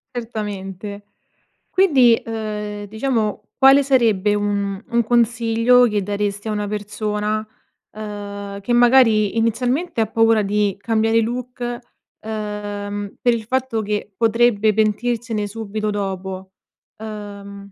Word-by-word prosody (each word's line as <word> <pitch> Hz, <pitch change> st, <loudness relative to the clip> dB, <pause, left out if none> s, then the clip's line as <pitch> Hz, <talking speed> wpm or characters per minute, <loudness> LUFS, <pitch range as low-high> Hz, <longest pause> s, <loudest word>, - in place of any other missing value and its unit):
Certamente, 205 Hz, -3 st, -6 dB, 0.7 s
quindi, 270 Hz, -12 st, +5 dB
uhm, 210 Hz, -2 st, -5 dB
diciamo 220 Hz, -1 st, -2 dB
quale 270 Hz, +1 st, +7 dB
sarebbe 225 Hz, -7 st, +2 dB
un 200 Hz, -1 st, -1 dB
un 235 Hz, 0 st, +1 dB
consiglio 235 Hz, +1 st, +3 dB
che 210 Hz, -2 st, -1 dB
daresti 205 Hz, +1 st, -3 dB
a -, -, -1 dB
una 210 Hz, -1 st, -2 dB
persona, 210 Hz, +1 st, -2 dB, 0.5 s
uhm, 205 Hz, -1 st, -7 dB
che 240 Hz, -, -4 dB
magari, 235 Hz, -4 st, +4 dB
inizialmente 245 Hz, +6 st, 0 dB
ha -, -, +3 dB
paura 225 Hz, -1 st, +3 dB
di 205 Hz, -1 st, 0 dB
cambiare 225 Hz, +1 st, +2 dB
look, 250 Hz, +2 st, -5 dB, 0.6 s
uhm, 205 Hz, -1 st, -5 dB
per 245 Hz, -2 st, +3 dB
il 230 Hz, -1 st, -3 dB
fatto 260 Hz, -1 st, -1 dB
che 210 Hz, 0 st, -3 dB
potrebbe 225 Hz, -1 st, +3 dB
pentirsene 220 Hz, 0 st, 0 dB
subito 215 Hz, 0 st, -4 dB
dopo? 190 Hz, -2 st, -4 dB, 0.5 s
Uhm, 200 Hz, -2 st, -9 dB
215 Hz, 110 wpm, -20 LUFS, 205-230 Hz, 0.7 s, quale